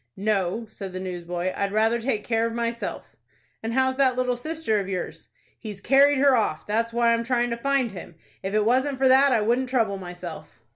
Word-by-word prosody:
"No," 200 +1 -1
said 195 -3 -8
the 185 - -4
newsboy; 180 0 -4
"I'd 200 0 -1
rather 225 +3 +2
take 225 -4 -1
care 230 -1 0
of 230 - -5
myself." 235 0 -4 0.5
"And 225 +1 -3
how's 260 0 +2
that 265 -2 +3
little 250 0 0
sister 305 -4 -1
of 195 -1 -4
yours?" 185 -2 -5 0.3
"He's 210 -4 -7
carried 275 +5 +4
her 275 0 +5
off. 210 -9 -1
That's 230 +2 0
why 235 0 +3
I'm 230 0 0
tryin' 240 0 0
to 235 - -2
find 270 -1 0
him. 175 -3 -10 0.3
If 195 +2 -3
it 215 -1 +2
wasn't 260 +4 +1
for 265 0 +3
that 265 +2 +6
I 235 -4 +3
wouldn't 245 +4 +1
trouble 220 -6 0
myself." 175 -2 -9
230 Hz, 205 wpm, -25 LUFS, 200-255 Hz, 0.5 s, that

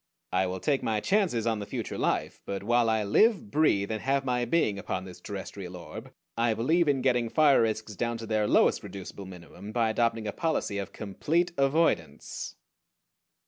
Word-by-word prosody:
I 95 +1 +2
will 95 +1 -4
take 140 +6 +1
my 110 -1 0
chances 175 - +1
on 115 -2 0
the 100 - -5
future - - -4
life; - - -1
but 100 0 -4
while 120 +1 +3
I 110 -1 +1
live, 210 - +3
breathe, 110 -10 +2
and 110 -1 -3
have 135 0 0
my 125 -1 0
being 115 -10 +1
upon 95 -1 -4
this 90 -2 -11
terrestrial 95 -2 -7
orb 85 - -9 0.2
I 115 -1 +1
believe 160 +9 +2
in 135 -3 +1
getting 120 -3 +2
fire 145 -1 +5
risks 110 -1 -1
down 115 +3 -2
to 115 - -7
their 110 -1 +1
lowest - - +3
reducible 100 0 -8
minimum 95 +3 -10
by 115 -1 +1
adopting 115 -1 0
a 105 - -2
policy 155 -11 -1
of 100 - -5
complete 155 - -1
avoidance. 135 - 0
115 Hz, 185 wpm, -28 LUFS, 100-135 Hz, 0.2 s, fire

